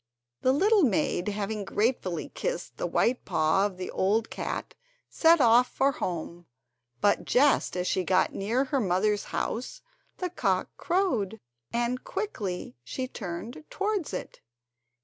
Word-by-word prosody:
The 260 - +4
little 405 +9 +4
maid, 205 - +1
having 210 0 -2
gratefully 200 -4 -1
kissed - - -4
the - - -1
white 245 +1 +1
paw 160 +6 +2
of 190 -3 -11
the 185 - -5
old 215 +4 +1
cat, - - -4 0.4
set 330 0 +5
off 245 0 +6
for 275 +1 +2
home; 170 -5 -5 0.5
but 205 - +3
just 270 -7 +3
as 180 - -1
she 185 - +1
got 185 +1 +2
near 225 +7 0
her 275 0 0
mother's 205 0 +1
house 255 - -3 0.3
the 365 -2 -3
cock - - 0
crowed, 250 - 0 0.3
and 240 +1 -1
quickly 210 - -4
she 255 - -4
turned 215 - -6
towards 400 -4 -1
it. - - -6
225 Hz, 140 wpm, -28 LUFS, 190-280 Hz, 0.5 s, off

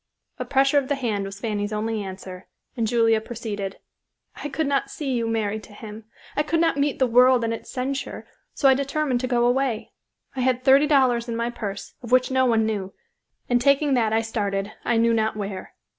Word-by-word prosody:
A - - -3
pressure 275 +1 +3
of 270 - -5
the 285 - 0
hand 220 -7 -2
was 195 0 -8
Fanny's 205 -1 -2
only 215 0 -2
answer, 185 -1 -8 0.3
and 230 -3 0
Julia 225 -1 +3
proceeded: 215 -4 -5 0.6
"I 290 - -5
could 310 +3 -1
not 280 -1 0
see 285 -3 -4
you 235 -2 0
married 220 -1 -1
to 210 - -16
him. 215 0 -10 0.3
I - - +2
could 325 +2 0
not 330 -2 +2
meet 285 0 0
the 260 - +3
world 250 0 +5
and 230 0 0
its 230 - -8
censure, 265 +1 -4 0.3
so 280 - +3
I 265 - +7
determined 275 -1 0
to 255 - -2
go 240 -1 +2
away. 245 -2 0 0.4
I - - -4
had 255 0 +1
thirty 275 +2 +6
dollars 255 -5 +3
in 230 - -2
my 235 +1 -1
purse, 200 -4 -6
of 240 -2 -9
which 255 +1 +4
no 260 0 +3
one 225 -2 +3
knew, 200 -3 -3 0.5
and 245 -1 +2
taking 280 +2 +3
that 230 -4 +2
I 220 +1 +2
started, 205 -3 -2
I 235 - +1
knew 230 0 +3
not 220 -1 0
where. 200 -2 -6
235 Hz, 210 wpm, -24 LUFS, 215-265 Hz, 0.6 s, I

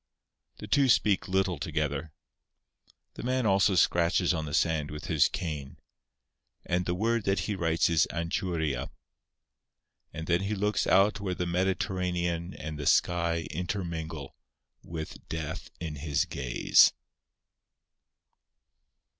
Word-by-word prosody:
The - - -8
two 135 +5 +3
speak 105 -4 +3
little 95 -3 0
together. 75 0 -2 1.0
The - - -8
man 130 0 0
also 100 -1 +3
scratches 85 +1 +3
on 80 -2 -2
the 75 - -6
sand 80 -3 +1
with 75 0 -7
his 80 -4 +3
cane. 75 -6 -5 0.9
And 90 +1 0
the 90 - 0
word 115 +3 0
that 95 -2 +1
he 105 - -2
writes 85 -3 +1
is 80 -2 +3
"Anchuria." 85 -5 -2 1.2
And 80 +1 -6
then 85 +2 +2
he 100 +2 -2
looks 105 +1 0
out 100 +3 +4
where 95 -3 -3
the 90 - -2
Mediterranean 90 -1 -1
and 75 -1 -6
the 75 - -3
sky 85 -1 +2
intermingle, 80 -4 -4 0.5
with 80 -1 -7
death 80 -2 -5
in 80 -3 -5
his 75 0 0
gaze. 65 -3 +4
85 Hz, 125 wpm, -29 LUFS, 80-95 Hz, 1.2 s, out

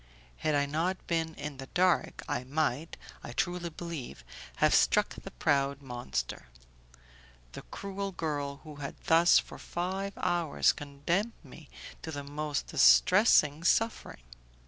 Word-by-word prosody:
Had 155 -1 0
I 145 0 +2
not 165 +6 -2
been 165 -1 -1
in 145 -1 -6
the 135 0 -8
dark, 180 +2 +1
I 120 - -2
might, 150 +2 -2 0.3
I 120 - -7
truly 175 +4 -1
believe, 160 - -7 0.3
have - - +3
struck - - +4
the - - -9
proud 140 0 0
monster, 120 - -4 1.0
the - - -8
cruel 200 0 -5
girl, 145 -5 -3
who 150 -2 -10
had 140 -1 -6
thus 165 +1 +6
for - - -3
five 190 +3 -3
hours 175 -4 +2
condemned 160 +10 -2
me 145 +1 -14 0.3
to - - -7
the 145 -2 -5
most 145 0 -3
distressing 65 - +5
suffering. 225 - 0
155 Hz, 135 wpm, -30 LUFS, 140-175 Hz, 1.0 s, thus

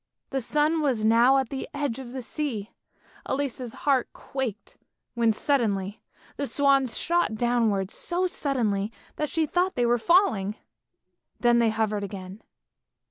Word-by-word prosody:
The 270 -1 -1
sun 300 +6 +1
was 250 -7 +1
now 235 +4 +5
at 265 -3 0
the 270 - -5
edge 280 -4 -2
of 250 -2 -8
the 260 -1 -5
sea. 235 -6 -4 0.6
Elise's 260 -3 -2
heart 270 -4 +2
quaked, 250 -6 -5 0.3
when 235 -2 +3
suddenly 210 -5 0 0.4
the 280 - -2
swans 275 -3 +2
shot 345 -9 +1
downwards 220 -4 +1
so 355 +1 -1
suddenly, 230 - -1 0.3
that 300 -1 -1
she 325 -1 +1
thought 360 +4 0
they 245 - +2
were 240 0 +3
falling, 220 - +3 0.8
then 240 -1 +4
they 230 -1 +4
hovered 215 -2 -1
again. 195 +1 -7
245 Hz, 140 wpm, -26 LUFS, 220-280 Hz, 0.8 s, now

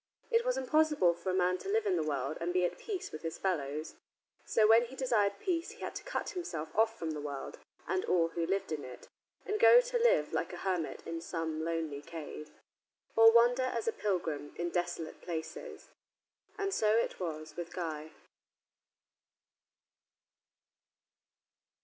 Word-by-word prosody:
It 460 0 +4
was - - 0
impossible 295 - +3
for 175 +2 -5
a - - +1
man 180 0 +2
to - - -6
live 435 +1 +2
in 385 -3 +2
the - - +1
world 145 -1 -2
and 170 +1 0
be 180 0 +2
at - - -3
peace 400 -5 -4
with 155 - -7
his 165 -1 -4
fellows. 155 -5 -2 0.5
So 220 - +3
when 225 +2 +6
he 255 +3 -10
desired 210 -7 +1
peace 340 -2 -1
he - - -16
had - - -4
to - - -6
cut - - -3
himself 165 - -5
off 225 +1 +3
from 165 -1 -3
the 150 -1 -4
world 145 -2 -6 0.3
and 370 - 0
all 170 -2 +3
who 165 0 -2
lived 195 -2 -1
in 150 -2 -3
it, 125 -1 -10 0.4
and 425 +1 -1
go 475 +2 +9
to - - 0
live 480 +1 +3
like - - -1
a - - -5
hermit 180 -4 -1
in 165 0 -4
some 160 -2 -3
lonely 160 -3 -2
cave, 155 -1 -8 0.7
or 225 0 +9
wander 240 +2 +5
as 255 - -1
a 455 - +2
pilgrim 165 - -2
in 175 0 -2
desolate 175 -2 -3
places. 165 -2 -6 0.7
And 395 -1 -1
so 215 - +3
it 230 - 0
was 155 -3 -5
with 175 0 -6
Guy. 160 -3 -4
180 Hz, 175 wpm, -32 LUFS, 160-255 Hz, 0.7 s, go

